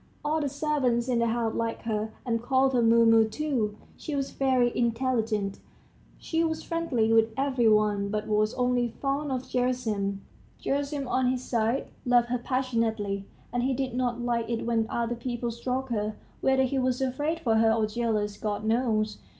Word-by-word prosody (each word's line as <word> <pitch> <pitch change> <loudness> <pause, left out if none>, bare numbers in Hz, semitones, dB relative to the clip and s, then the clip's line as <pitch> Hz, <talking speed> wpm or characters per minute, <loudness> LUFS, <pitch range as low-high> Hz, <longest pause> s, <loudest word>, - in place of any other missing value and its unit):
All 310 +1 +1
the 285 - -1
servants 265 -5 0
in 245 -2 +1
the 235 - +2
house 225 -1 0
liked 230 0 -2
her, 220 -1 -2
and 230 -2 0
called 265 +2 +2
her 245 - +3
Mumu, 225 0 +6
too. 230 -5 -1 0.2
She 300 - -4
was 275 -1 -2
very 255 -3 +2
intelligent, 230 -4 0 0.6
she 325 0 -1
was 320 -1 -1
friendly 260 -10 0
with 225 0 +5
every 265 -4 +2
one, 210 -2 +2
but 210 0 -2
was 215 +1 +1
only 245 -1 +1
fond 280 +1 -1
of 255 -1 -2
Gerasim. 220 -6 -1 0.4
Gerasim, 280 0 -2
on 255 0 +1
his 255 0 0
side, 235 +2 0
loved 245 -1 +3
her 250 0 0
passionately, 230 -6 -1 0.3
and 245 - +1
he 260 +1 +1
did 260 -1 -2
not 245 -1 -1
like 235 -1 -1
it 230 -1 -2
when 230 -1 +1
other 235 0 -1
people 240 0 -3
stroked 255 +2 -3
her; 210 -1 -1 0.3
whether 265 0 +3
he 265 +1 0
was 255 -1 0
afraid 290 +5 -1
for 225 -6 +2
her, 225 0 +4
or 225 -1 +2
jealous 215 -2 -1
God 210 -1 -3
knows! 220 -2 +1
240 Hz, 175 wpm, -27 LUFS, 225-260 Hz, 0.6 s, Mumu